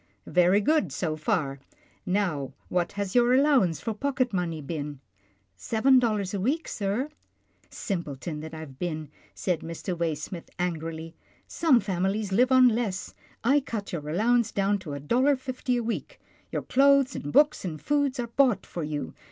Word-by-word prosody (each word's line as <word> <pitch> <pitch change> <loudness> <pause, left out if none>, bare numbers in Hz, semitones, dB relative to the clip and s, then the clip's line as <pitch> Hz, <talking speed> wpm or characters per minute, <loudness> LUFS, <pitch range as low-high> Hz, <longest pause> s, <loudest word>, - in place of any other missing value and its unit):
" - - -45
Very 180 +3 +4
good, 255 - +2
so 155 +2 -2
far 145 -3 -1 0.2
— - - -34
now 175 -9 0 0.2
what 175 -1 0
has 200 -1 -3
your 245 0 +5
allow: 280 0 +5
ance 170 -4 0
for 225 - -3
pocket 255 0 -1
money 170 -4 -1
been? 145 -1 -5 0.2
" 100 0 -37
" - - -46
Seven 255 +3 +3
dollars 210 -6 0
a 200 - -1
week, 280 - 0
sir." 215 +8 -2 0.3
" - - -38
Simpleton 155 -4 -4
that 160 +1 -7
I 160 - -7
have 135 -4 -11
been," 155 -4 -3 0.3
said 180 -4 -1
Mr. 165 +3 -5
Way 165 -2 0
smith 165 +3 -7
angrily, 165 -2 -3 0.2
" - - -34
some 310 -7 +3
families 195 +1 -1
live 250 +6 +3
on 260 -1 +7
less 215 -4 -2 0.2
— - - -32
I 275 +5 +4
cut 220 -8 -5
your 150 -3 -4
allowance 225 +6 +2
down 200 +1 +1
to 165 -6 -7
a 140 - -4
dollar 255 - +3
fifty 255 -1 -2
a 240 - -1
week. 230 0 -4 0.3
Your - - -2
clothes, 275 -1 +4
and 145 - -5
books 295 - +4
and 160 -5 -4
food 285 - 0
are 240 - 0
bought 245 -1 +2
for 175 - -6
you. 150 -1 -4
195 Hz, 195 wpm, -27 LUFS, 160-250 Hz, 0.3 s, on